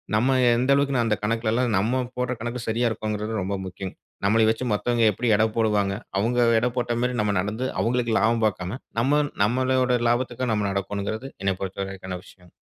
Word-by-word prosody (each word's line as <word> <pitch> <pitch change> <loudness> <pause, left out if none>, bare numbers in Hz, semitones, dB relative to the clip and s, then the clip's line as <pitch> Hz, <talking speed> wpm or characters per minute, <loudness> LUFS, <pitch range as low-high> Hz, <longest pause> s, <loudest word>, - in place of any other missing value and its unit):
நம்ம 130 +5 +3 0.2
எந்த 130 +3 +2
அளவிற்கு, 140 -3 +2
அந்த 110 -2 +2
கணக்கில 115 +1 0
எல்லாம் 120 -2 +1
நம்ம 120 +6 +1 0.2
போடுற 125 0 -1
கணக்கு 120 +2 -3
சரியா 115 +2 +1
இருக்குன்றது 110 0 -3
ரொம்ப 100 +2 -2
முக்கியம்ங்க. 95 0 -7 0.3
நம்மளை 110 +3 +4
வைச்சு 115 +3 -1
மத்தவங்க 120 +2 +1
எப்டி 120 +5 -3
எடை 110 +2 +3
போடுவாங்க. 105 -3 +1 0.2
அவங்க 115 +5 +1 0.2
எடை 125 +2 +1
போட்ட 120 -1 0
மாதிரி, 125 0 0
நம்ம 105 -1 +1
நடந்து 105 +6 -2 0.2
அவங்களுக்கு 120 -1 0
லாபம் 115 +2 +2
பார்க்காம 95 +1 -2 0.2
நம்ம 140 +5 +3 0.2
நம்முடைய 125 +2 +2
லாபத்திற்காக 120 +1 -1
நம்ம 105 -1 0
நடக்கனும்கிறது 100 +5 -3
என்னை 95 0 +2
பொறுத்தவரைக்கான 95 -1 -5
விஷயம். 90 -2 -18
115 Hz, 170 wpm, -24 LUFS, 100-125 Hz, 0.3 s, நம்மளை